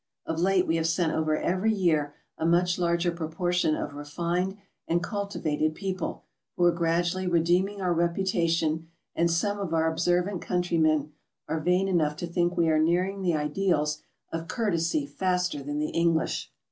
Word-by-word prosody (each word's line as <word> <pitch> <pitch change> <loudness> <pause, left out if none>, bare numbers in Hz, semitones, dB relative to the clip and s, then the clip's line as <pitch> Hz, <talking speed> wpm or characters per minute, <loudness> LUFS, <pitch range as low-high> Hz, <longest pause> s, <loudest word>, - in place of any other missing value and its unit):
Of 165 0 -2
late 185 +1 +3
we 165 - +1
have 165 0 0
sent 165 -1 +1
over 155 -1 +1
every 185 +7 +1
year 160 -8 +1 0.2
a - - -5
much 175 +2 +2
larger 170 0 +1
proportion 170 0 0
of 145 - -4
re 145 0 -7
fined 175 +6 -2 0.3
and 170 +1 +1
cultivated 170 -7 -1
people, 190 0 -4 0.3
who 175 - +2
are 175 - +6
gradually 170 +2 0
redeeming 180 +4 +2
our 180 -2 +1
reputation, 170 -2 0 0.3
and 170 0 +2
some 205 +5 0
of 175 -5 -2
our 160 0 +2
observant 175 +3 0
countrymen 155 -4 +1 0.4
are 160 - -1
vain 180 +4 +2
enough 160 -5 +1
to 175 - -4
think 175 +1 0
we 170 - +3
are 155 -1 +3
nearing 180 +5 +1
the 175 -3 +1
ideals 150 -1 0 0.3
of 165 0 -4
courtesy 165 - 0
faster 180 +1 -1
than 145 +1 -4
the 150 0 -1
English. 165 -1 0
170 Hz, 165 wpm, -27 LUFS, 160-180 Hz, 0.4 s, are